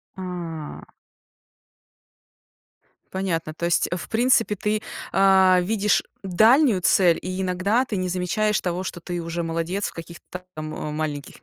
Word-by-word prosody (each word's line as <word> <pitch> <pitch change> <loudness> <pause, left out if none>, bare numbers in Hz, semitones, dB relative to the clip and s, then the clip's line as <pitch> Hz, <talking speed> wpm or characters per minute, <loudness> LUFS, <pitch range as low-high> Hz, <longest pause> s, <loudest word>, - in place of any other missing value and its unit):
А-а. 170 -5 -7 2.2
Понятно, 170 -5 -2
то 170 - -4
есть 170 - +2
в 175 - -6
принципе 230 -2 +2
ты, 210 +2 -1 0.3
а-а, 190 -1 +5
видишь 210 +2 +1 0.2
дальнюю 220 - +4
цель, 175 -3 +4
и 185 +1 -4
иногда 190 +6 +1
ты 225 - -4
не 185 0 -1
замечаешь 200 +4 0
того, 180 0 -2
что 175 -2 -6
ты 175 0 -4
уже 170 +1 -3
молодец 165 +4 -2
в - - -8
каких-то 170 +1 -10
та 180 0 -8
ам 155 0 -5 0.3
маленьких 150 -2 -4
185 Hz, 135 wpm, -23 LUFS, 170-200 Hz, 2.2 s, а-а